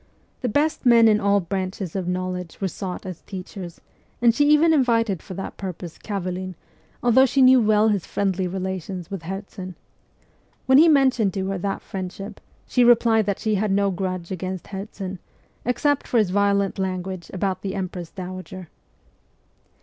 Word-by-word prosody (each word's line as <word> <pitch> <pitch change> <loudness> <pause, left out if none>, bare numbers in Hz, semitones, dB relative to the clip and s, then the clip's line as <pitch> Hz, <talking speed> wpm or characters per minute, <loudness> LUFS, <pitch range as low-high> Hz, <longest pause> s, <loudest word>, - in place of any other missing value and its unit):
The 250 - -1
best 300 +7 +1
men 235 -3 +6
in 210 -1 +4
all 200 -1 +3
branches 185 0 -4
of 185 -2 -2
knowledge 180 -1 -3
were 195 - 0
sought 185 +1 -6
as 185 -3 -7
teachers, 185 -2 -8 0.4
and 235 -1 +5
she 290 +4 +3
even 315 +2 +5
invited 230 - +2
for 185 - -9
that 195 - -6
purpose 180 -3 -7
Kavelin, 185 -2 -4 0.5
although 255 +2 +5
she 265 +2 0
knew 255 0 +7
well 215 0 +4
his 200 -5 -1
friendly 190 -2 -1
relations 185 -1 -5
with 195 -4 -4
Herzen. 185 +1 -7 0.9
When 265 +1 +6
he 330 - +7
mentioned 260 - +3
to 190 -1 -1
her 195 - -2
that 195 +2 -3
friendship, 195 +2 -7 0.2
she 250 - +2
replied 230 -3 +4
that 200 - 0
she 220 -2 -1
had 205 0 0
no 200 0 +2
grudge 185 -1 -4
against 185 0 -5
Herzen, 195 -1 -6 0.5
except 280 +4 +1
for 245 - +1
his 210 -5 +3
violent 200 0 +1
language 185 -1 -3
about 190 0 -2
the 195 0 -4
empress 180 -3 -4
dowager. 185 -1 -8
195 Hz, 165 wpm, -23 LUFS, 185-220 Hz, 0.9 s, knew